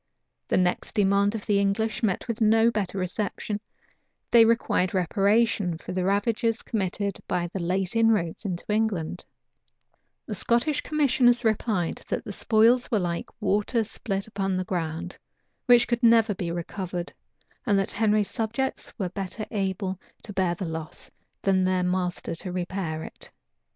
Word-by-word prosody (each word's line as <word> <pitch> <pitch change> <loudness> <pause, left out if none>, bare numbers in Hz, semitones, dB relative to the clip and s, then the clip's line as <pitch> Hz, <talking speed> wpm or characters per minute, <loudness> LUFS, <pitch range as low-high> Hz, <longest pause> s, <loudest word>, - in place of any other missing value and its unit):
The - - +1
next 180 +3 0
demand 200 0 +3
of 215 - -5
the 205 -2 +2
English 215 +3 0
met 215 -2 0
with 230 -1 -3
no 225 +1 +5
better 200 -3 -2
reception: 205 +2 -3 0.7
they 230 -1 +8
required 225 -5 +1
reparation 200 0 +2
for - - -8
the 185 0 -1
ravages 220 +4 +1
committed 200 -2 -2
by 175 -1 -1
the 195 - -2
late 185 +3 -1
inroads 220 -8 +2
into 180 -4 -4
England: 210 -6 -1 1.0
the 220 - -5
Scottish 240 - +1
commissioners 260 -5 +2
replied, 215 -5 0
that - - -3
the - - -5
spoils 230 +4 +3
were 225 - +2
like 175 -3 -2
water 210 +3 +1
spilt 195 -2 -4
upon 195 -3 -2
the 185 - -2
ground, 170 -1 -4 0.5
which 245 -1 +6
could 240 -1 0
never 230 -2 +5
be 180 -2 -4
recovered; 175 +1 -4 0.5
and 205 -3 +4
that 195 - 0
Henry's 215 -2 +2
subjects 235 +4 -3
were 190 -5 -2
better 195 +3 -5
able 190 -2 -2 0.2
to 205 - -8
bear 185 -3 +1
the 185 - -4
loss, 160 -1 -7 0.3
than 190 -1 +3
their 185 0 +1
master 180 -1 -1
to 180 +2 -6
repair 175 -3 -3
it. - - -11
200 Hz, 150 wpm, -26 LUFS, 180-225 Hz, 1.0 s, they